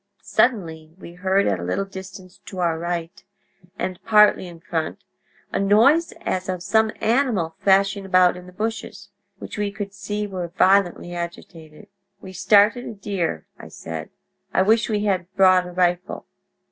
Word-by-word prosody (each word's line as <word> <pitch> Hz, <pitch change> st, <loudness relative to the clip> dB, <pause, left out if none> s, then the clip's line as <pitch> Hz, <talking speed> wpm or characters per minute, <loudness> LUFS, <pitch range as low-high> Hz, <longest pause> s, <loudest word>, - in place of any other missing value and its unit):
Suddenly, 165 Hz, -10 st, 0 dB
we 170 Hz, -2 st, -11 dB
heard, 190 Hz, +2 st, +1 dB
at 95 Hz, -3 st, 0 dB
a -, -, -6 dB
little 90 Hz, -, -1 dB
distance 190 Hz, -1 st, -11 dB
to 190 Hz, -, -9 dB
our 170 Hz, -3 st, 0 dB
right, 170 Hz, 0 st, -4 dB, 0.5 s
and 185 Hz, -1 st, -4 dB
partly 210 Hz, -4 st, +4 dB
in 170 Hz, -1 st, -11 dB
front, 165 Hz, -2 st, -4 dB, 0.5 s
a -, -, 0 dB
noise 230 Hz, +12 st, +4 dB
as 185 Hz, 0 st, -3 dB
of 180 Hz, -1 st, -3 dB
some 220 Hz, +1 st, +2 dB
animal 220 Hz, -8 st, +1 dB
thrashing 195 Hz, +1 st, +3 dB
about 185 Hz, -2 st, +4 dB
in 180 Hz, 0 st, -11 dB
the -, -, -12 dB
bushes, 220 Hz, +5 st, -5 dB, 0.3 s
which -, -, -8 dB
we 205 Hz, -1 st, -1 dB
could 200 Hz, -1 st, -6 dB
see 205 Hz, +1 st, -4 dB
were 185 Hz, -3 st, -5 dB
violently 185 Hz, 0 st, +2 dB
agitated. 170 Hz, -2 st, -8 dB, 0.3 s
"'We've 190 Hz, -1 st, -11 dB
started 210 Hz, +6 st, +4 dB
a -, -, -6 dB
deer,' 195 Hz, -4 st, -3 dB, 0.2 s
said. 80 Hz, -1 st, -7 dB, 0.5 s
'I -, -, +4 dB
wish 220 Hz, +4 st, +2 dB
we 210 Hz, -1 st, 0 dB
had 185 Hz, -3 st, -1 dB
brought 185 Hz, -2 st, +5 dB
a -, -, -8 dB
rifle.' 180 Hz, +1 st, -1 dB
190 Hz, 160 wpm, -22 LUFS, 175-205 Hz, 0.5 s, brought